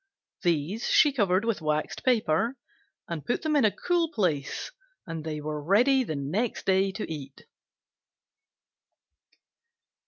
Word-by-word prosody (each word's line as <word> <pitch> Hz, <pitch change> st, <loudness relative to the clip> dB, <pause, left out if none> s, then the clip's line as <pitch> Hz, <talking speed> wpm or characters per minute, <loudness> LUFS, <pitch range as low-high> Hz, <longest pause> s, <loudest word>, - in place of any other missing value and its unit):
These 175 Hz, +6 st, 0 dB
she 295 Hz, -2 st, +5 dB
covered 200 Hz, -4 st, +2 dB
with 230 Hz, -6 st, -1 dB
waxed 155 Hz, 0 st, -2 dB
paper 230 Hz, 0 st, +1 dB, 0.5 s
and 165 Hz, -4 st, -5 dB
put 245 Hz, -, -2 dB
in 310 Hz, -1 st, +1 dB
a 215 Hz, -, +6 dB
cool 345 Hz, -, 0 dB
place 160 Hz, -, -1 dB, 0.3 s
and 165 Hz, -4 st, -5 dB
they 155 Hz, -1 st, -4 dB
were 150 Hz, 0 st, -4 dB
ready 250 Hz, -, +4 dB
the 160 Hz, -10 st, -4 dB
next 175 Hz, -, -2 dB
day 190 Hz, 0 st, +3 dB
to 215 Hz, -, -4 dB
eat. 140 Hz, -4 st, -8 dB
190 Hz, 125 wpm, -27 LUFS, 155-235 Hz, 0.5 s, a